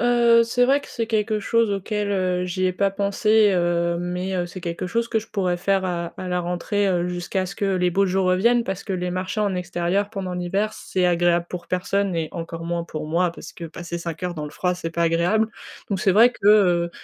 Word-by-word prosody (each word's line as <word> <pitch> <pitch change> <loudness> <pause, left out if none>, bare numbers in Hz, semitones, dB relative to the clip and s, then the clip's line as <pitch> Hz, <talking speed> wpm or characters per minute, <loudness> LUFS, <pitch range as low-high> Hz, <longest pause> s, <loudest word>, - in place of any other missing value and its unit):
Heu, 235 -1 +5
c'est 245 +2 +2
vrai 275 +3 +3
que - - -13
c'est 230 -2 -3
quelque 215 -1 0
chose 230 0 +1
auquel, 205 +1 -2
heu, 180 -1 0
j'y 185 +1 -1
ai 185 - +1
pas 195 +2 +1
pensé, 205 +2 +3
heu 170 -1 +1
mais 180 +2 -3
heu, 175 -1 -1
c'est 185 +1 -9
quelque 170 +1 -4
chose 230 +5 -1
que 225 - +1
je 220 - -8
pourrais 185 -4 0
faire 195 +1 +1
à 170 -2 -3
à 185 - -6
la 180 - 0
rentrée, 180 +4 -1
heu, 180 -1 0
jusqu'à 180 +1 -2
ce 200 - -8
que - - -2
les 180 -1 +1
beaux 195 +2 +2
jours 190 0 +1
reviennent 235 +7 +3
parce 190 -3 -5
que 195 - -4
les 180 -1 -2
marchés 185 +4 -3
en 200 -2 +1
extérieur 180 +3 -1
pendant 190 -4 -4
l'hiver, 195 +5 -1
c'est 185 -3 -2
agréable 175 0 +2
pour 175 -1 -6
personne 190 +1 0
et 160 -2 -1
encore 165 -1 -6
moins 170 0 -2
pour 155 -2 -6
moi 170 +1 +1
parce - - -10
que 170 - -9
passer 170 +1 -6
5 170 0 -6
heures 180 -1 -2
dans 150 -1 -5
le 150 - -7
froid, 180 +2 0
c'est 165 -2 -5
pas 170 - -1
agréable. 175 +7 +2 0.4
Donc 195 -3 -1
c'est 190 -1 +2
vrai 230 +5 +7
que, 200 - -4
heu, 180 -5 +5
185 Hz, 240 wpm, -23 LUFS, 175-205 Hz, 0.4 s, vrai